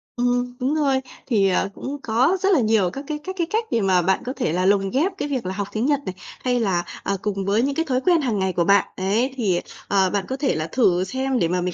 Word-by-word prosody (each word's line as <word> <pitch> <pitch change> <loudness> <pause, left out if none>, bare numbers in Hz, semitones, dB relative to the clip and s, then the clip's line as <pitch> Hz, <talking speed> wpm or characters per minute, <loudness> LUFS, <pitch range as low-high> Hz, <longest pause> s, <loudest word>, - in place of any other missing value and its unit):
Ừm, 245 0 0
đúng 265 +4 0
rồi. 275 -4 +2 0.3
Thì, 200 -6 +3
ờ, 195 +1 +1
cũng 285 +2 -5
có 255 +12 +2
rất 390 - +3
là 320 - +4
nhiều 215 -5 +2
các 275 - -7
cái 305 -1 -2
các 375 0 -5
cái 340 -2 0
cách 445 +1 0
để 230 - +2
mà 185 -2 +3
bạn 190 +2 +1
có 255 - -3
thể 200 - -1
là 180 +1 0
lồng 195 0 +3
ghép 310 - +1
cái - - -2
việc 260 -8 -3
là 185 - -2
học 200 0 -3
tiếng 220 +3 -1
Nhật 290 -1 +2
này, 185 - -4 0.3
hay 250 -1 +1
là, 185 -6 +1 0.2
à, 200 - -1
cùng 195 -2 -2
với 205 +3 +2
những 275 +2 0
cái 325 +2 0
thói 255 -3 0
quen 340 +1 +3
hàng 230 -7 -1
ngày 190 -1 0
của 175 - +1
bạn. 200 +3 +5
Ấy, 220 +8 0
thì, 195 -8 +1 0.3
ờ, 190 -2 +3
bạn 200 -1 -1
có 265 - -3
thể 270 - 0
là 155 +1 -2
thử 180 -4 +2
xem 260 +5 -1
để 170 - +2
mà 180 +1 0
mình 180 -1 -2
230 Hz, 280 wpm, -22 LUFS, 190-270 Hz, 0.3 s, bạn